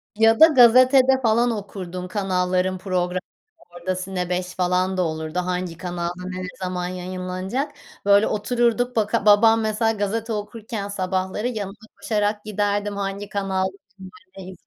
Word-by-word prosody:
Ya 225 +1 +4
da, 320 - +10
gazetede, 255 -1 +6
falan, 235 +1 +3
okurdun 185 -4 -6
kanalların 185 -1 0
programı 180 -1 -1 0.5
orada 175 +2 -4
Cine5 180 -1 -3
falan 185 +1 0
da - - +2
olurdu, 160 0 -2
hangi 180 -2 -3
kanalda 175 0 -4
ne 185 0 -5
ne - - -4
zaman 180 -1 -3
yayınlanacak. 185 +8 -4 0.3
Böyle, 200 +1 +5
otururduk 240 +3 0
baka 220 -1 0
babam, 225 +2 +6
mesela, 220 +1 +1
gazete 220 +2 -2
okurken 210 0 -5
sabahları 190 +2 -2
yanına 205 -5 -4 0.3
koşarak 210 0 -1
giderdim, 205 -1 -1
hangi 200 0 -4
kanal 195 -2 -1 0.7
ne 190 -1 -8
200 Hz, 130 wpm, -22 LUFS, 185-220 Hz, 0.7 s, da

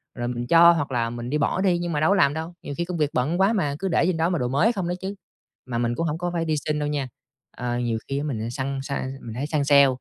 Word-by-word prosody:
rồi 120 -1 -3
mình 120 0 -3
cho 170 +2 +8
hoặc 150 -5 -1
là 120 -2 0
mình 120 +1 -6
đi 150 - +1
bỏ 150 +5 0
đi 185 -3 +3
nhưng 175 0 -3
mà 150 - 0
đâu 155 - +3
có 200 - +4
làm 140 -6 +4
đâu, 160 +3 -5
nhiều 145 - -5
khi 170 - -1
công 175 0 -4
việc 150 -2 +1
bận 150 +8 0
quá 195 +4 +4
mà, 150 -10 0
cứ 195 - -2
để 170 - +2
trên 180 -1 +1
đó 165 +1 +2
mà 175 -3 0
đồ 125 - 0
mới 140 - +3
không 190 -5 -2
đó 175 - -1
chứ. 195 +1 -4 0.5
Mà 125 -2 -3
mình 120 0 0
cũng 165 - -1
hổng 155 0 -2
có 175 +1 -2
phải 165 -1 -1
đi 155 -1 0
xin 150 -1 0
đâu 150 - -1
nha, 145 -3 -2 0.5
ờ, 120 -1 -2
nhiều 120 -2 -1
khi 135 - -2
á 140 - -2
mình 115 -7 -3
săn 135 +1 -3
săn 135 -1 -4
mình 115 -2 -8
hay 135 +4 -3
săn 150 -1 0
sale, 140 -1 +6
145 Hz, 320 wpm, -24 LUFS, 130-170 Hz, 0.5 s, cho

